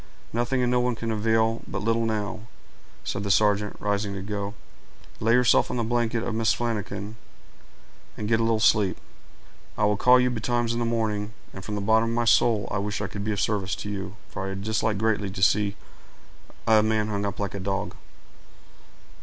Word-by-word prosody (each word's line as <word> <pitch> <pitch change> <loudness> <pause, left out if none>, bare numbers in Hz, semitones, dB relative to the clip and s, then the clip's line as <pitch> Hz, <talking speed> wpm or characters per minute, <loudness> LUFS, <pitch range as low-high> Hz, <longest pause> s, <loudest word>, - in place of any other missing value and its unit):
"Nothing 120 +2 0
and 120 - +1
no 125 - +3
one 125 0 +1
can 115 0 -3
avail 110 +1 +1
but 95 +1 -4
little 115 +1 +1
now," 110 0 -3 0.6
said 100 - -3
the 100 - -3
sergeant, 105 0 +2
rising 100 -1 -1
to 95 - -5
go. 100 0 -4 0.6
"Lay 115 +1 +2
yourself 125 -2 +4
on - - -2
the 120 - 0
blanket 115 0 0
of 120 - -2
Mrs. 110 0 +2
Flanagan, 105 -2 -3 1.0
and 105 - -3
get 110 0 +2
a - - +2
little 115 -1 +2
sleep; 105 -3 +3 0.8
I 105 - +2
will 105 -1 +2
call 125 +4 +6
you 125 0 +2
betimes 120 0 0
in 120 - -2
the 120 - 0
morning; 110 -2 -1 0.2
and 95 - -8
from 105 - -4
the 100 - -2
bottom 110 +3 +3
of 115 - -1
my 120 0 +1
soul 115 -2 +3
I 95 - 0
wish 105 +1 -2
I - - -2
could 100 - -5
be 110 - -1
of 100 - -2
some 105 - +1
service 95 0 -3
to 105 - -6
you, 100 -1 -5
for 95 -1 -5
I 95 - -4
dislike 110 +1 -1
greatly 105 -1 0
to 95 0 -3
see 100 0 +3 0.9
a 110 -1 +5
man 110 0 +1
hung 100 -1 -2
up 100 - -3
like 100 -1 -2
a 100 - -4
dog." 95 0 -2
110 Hz, 205 wpm, -26 LUFS, 100-115 Hz, 1.0 s, call